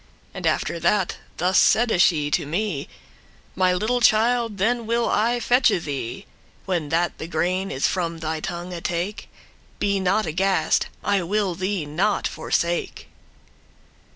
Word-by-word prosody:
And - - -3
after 170 - 0
that 180 +2 +1 0.2
thus 180 +2 +3
saide 225 -6 +4
she 150 -5 +3
to 145 - 0
me; 170 -3 -2 0.7
'My 185 0 +3
little 220 +7 0
child, 230 -1 +3
then 230 +3 0
will 235 +1 +1
I 235 +3 +1
fetche 240 -6 +3
thee, 140 - -5 0.4
When 175 -6 -2
that 170 +2 0
the 160 - -5
grain 180 +4 -1
is 135 - -1
from 170 -3 -1
thy 160 -1 -3
tongue 175 +3 -5
take: 175 +5 -3 0.5
Be 200 -1 0
not 195 +3 +1
aghast,* 190 +4 +1 0.2
I 200 -1 +1
will 195 +1 0
thee 185 -1 -2
not 180 +8 0
forsake. 170 0 -2
185 Hz, 140 wpm, -23 LUFS, 170-215 Hz, 0.7 s, saide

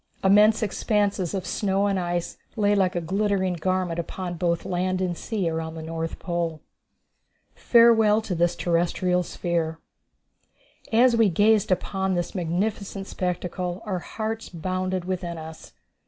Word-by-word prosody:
Immense 210 +3 +5
expanses 205 -3 0
of 190 - -3
snow 195 -1 0
and 200 -2 +1
ice 175 -1 -3 0.2
lay 205 -2 +2
like 190 -3 +2
a 175 - 0
glittering 190 +1 0
garment 180 0 -1
upon 175 +1 -4
both 170 -1 -1
land 185 +1 -1
and 180 -2 -1
sea 200 -1 -2
around 160 0 -3
the 160 - -7
North 165 0 -4
Pole. 170 -3 -2 0.9
Farewell 225 -3 +5
To 200 - -3
This 175 0 +1
Terrestrial 175 +1 +1
Sphere. 170 -2 -2 1.1
As 240 +2 +5
we 225 -3 +4
gazed 205 +3 +3
upon 190 +1 0
this 175 -1 -2
magnificent 195 +3 -2
spectacle, 180 +1 -3
our 190 -4 -2
hearts 220 +4 -5
bounded 185 +1 -3
within 180 -2 -3
us. 160 0 -10
185 Hz, 140 wpm, -25 LUFS, 175-205 Hz, 1.1 s, Immense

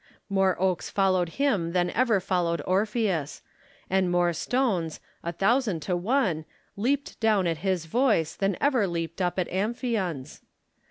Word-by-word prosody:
More 195 -2 +2
oaks 185 -2 0
followed 185 -3 +2
him 205 -13 +1
than 175 -1 +1
ever 235 -5 +2
followed 175 -4 -1
Orpheus; 195 - 0 0.4
and 190 -1 +1
more 175 -1 +2
stones, 185 - -1 0.2
a 170 - -3
thousand 200 0 +1
to 180 +4 -1
one, 185 - +1 0.3
leaped 275 +7 -1
down 215 -4 +3
at 165 -2 0
his 185 -2 -1
voice 210 - +2
than 195 -2 0
ever 260 -8 +2
leaped 170 0 -4
up 180 0 0
at 185 - 0
Amphion's. 200 - -2
190 Hz, 145 wpm, -26 LUFS, 175-220 Hz, 0.4 s, down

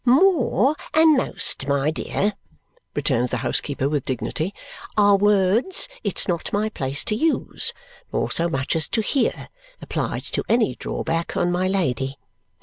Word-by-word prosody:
"More 275 - +4 0.2
and 315 -1 +6
most, 195 - 0
my 140 +1 +1
dear," 205 +5 -1 0.6
returns 125 -4 +1
the 125 - -1
housekeeper 140 -2 0
with 145 -2 -1
dignity, 145 +7 -2 0.5
"are 205 -1 +6
words 205 - +2 0.2
it's - - 0
not 175 -3 -2
my 210 +2 0
place 135 -8 -3
to 215 - 0
use 320 +7 0 0.4
nor - - -1
so 170 +1 +1
much 135 -2 -1
as 160 -2 +3
to 225 - 0
hear 270 +5 0 0.3
applied - - -3
to - - -3
any 230 - +3
drawback 165 +6 -3
on 175 0 +1
my 180 +1 +1
Lady." 135 -8 -1
185 Hz, 145 wpm, -23 LUFS, 140-225 Hz, 0.6 s, and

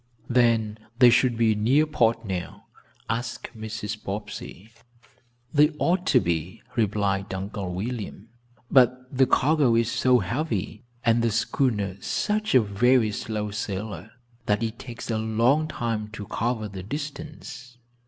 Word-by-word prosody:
"Then 115 -3 +2 0.2
they 125 -1 +7
should 120 -1 +3
be 115 -1 +3
near 125 +9 +3
port 115 -6 +1
now?" 95 -3 -5 0.4
asked 120 +1 -3
Mrs. 110 -1 -5
Bobbsey. 100 +1 -7 0.8
"They 150 0 +6
ought 180 +4 +1
to 125 - +5
be," 85 +1 -3
replied 100 -3 0
Uncle 95 -1 -4
William, 105 +2 -5 0.4
"but 130 0 +3
the 130 0 +4
cargo 145 -5 +3
is 115 0 +2
so 125 -1 +4
heavy, 115 - -2 0.2
and 115 0 +4
the 115 - +2
schooner 110 -4 0
such 215 -4 0
a 130 - +8
very 110 +2 +3
slow 105 0 -3
sailer, 105 0 -5 0.3
that 105 +2 +1
it 115 +1 -3
takes 120 -1 -7
a 110 - 0
long 115 +8 +2
time 115 -7 -3
to 105 -2 -6
cover 110 +1 -2
the 95 -2 -7
distance." 140 - -7
115 Hz, 135 wpm, -25 LUFS, 105-125 Hz, 0.8 s, a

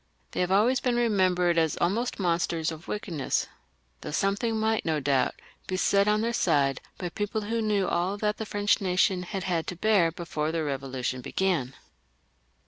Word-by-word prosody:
They - - -4
have 180 0 +1
always 230 +7 +4
been 245 -1 0
remembered 185 -7 +2
as 160 -2 +1
almost 225 +8 0
monsters 170 -3 0
of 160 +1 -10
wickedness, 175 -9 -2 0.6
though - - -6
something 200 +7 0
might 220 0 +1
no 160 -2 0
doubt 135 -2 +1 0.3
be 185 - -2
said 200 +2 +3
on 210 0 +3
their 235 +1 0
side 140 - +2 0.2
by 180 - -4
people 205 +4 -2
who 225 +2 -2
knew 205 -3 +1
all 180 +4 0
that 210 0 -1
the 220 - -5
French 205 0 +1
nation 185 0 +2
had 185 +1 -4
had 175 -3 -1
to 180 - -4
bear 185 -3 +3
before 155 -2 -3
the 165 - -2
Eevolution 130 -2 -3
began. 140 -5 -1
185 Hz, 175 wpm, -27 LUFS, 165-210 Hz, 0.6 s, always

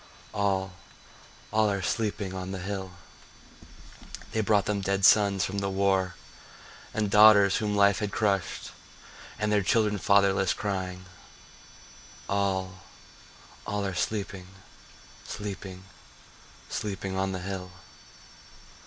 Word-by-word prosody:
— - - -23
All, 95 -2 0 0.8
all 110 -1 +3
are 100 -1 -2
sleeping 105 -2 -2
on 95 0 -5
the 95 - -4
hill. 95 0 -5 1.4
They 110 - 0
brought 105 -1 +2
them 105 -1 -1
dead 95 0 +1
sons 100 -3 +5
from 100 +1 -3
the 100 0 -2
war, 95 -2 +1 0.8
And 105 -1 -1
daughters 105 -2 +7
whom 105 -1 -1
life 100 -1 +4
had 105 -2 -2
crushed, 100 -4 -1 0.7
And 105 0 -1
their 105 -1 +3
children 105 +1 +1
fatherless, 100 -1 +3
crying— 95 -2 -4 1.2
All, 95 -2 -1 0.9
all 100 0 -2
are 95 - -2
sleeping, 95 -1 -3 0.8
sleeping, 95 -2 -7 0.8
sleeping 95 -2 -4
on 95 0 0
the 95 - -3
hill. 95 -1 -5
100 Hz, 115 wpm, -27 LUFS, 95-105 Hz, 1.4 s, daughters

